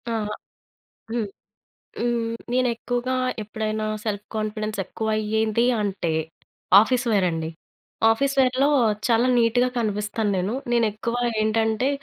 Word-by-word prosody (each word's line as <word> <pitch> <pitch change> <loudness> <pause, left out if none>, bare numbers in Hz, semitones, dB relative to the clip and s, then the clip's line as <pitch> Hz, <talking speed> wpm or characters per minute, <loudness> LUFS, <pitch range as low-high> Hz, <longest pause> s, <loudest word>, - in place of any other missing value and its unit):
అహా! 210 -1 -2 0.8
హ్మ్. 235 -2 0 0.7
హ్మ్. 240 0 0 0.4
నేను 255 0 +2
ఎక్కువగా 245 +2 -2 0.3
ఎప్పుడైనా 215 0 -3 0.2
సెల్ఫ్ 210 -2 -3
కాన్ఫిడెన్స్ 215 0 -3
ఎక్కువ 220 +4 -4
అయ్యేది 220 +1 +1 0.2
అంటే 195 -4 -2 0.7
ఆఫీస్ 245 +3 +1
వేర్ 200 -4 +3
అండి. 160 -1 -3 0.6
ఆఫీస్ 275 +5 +2
వేర్‍లో 260 +1 +3 0.4
చాలా 235 +1 +3
నీట్‌గా 240 +1 +3
కనిపిస్తాను 210 -1 -1
నేను. 190 +5 -1 0.2
నేను 235 -1 +3
ఎక్కువ 235 +3 -3 0.3
ఏంటంటే 220 +3 +1
220 Hz, 115 wpm, -24 LUFS, 210-240 Hz, 0.8 s, వేర్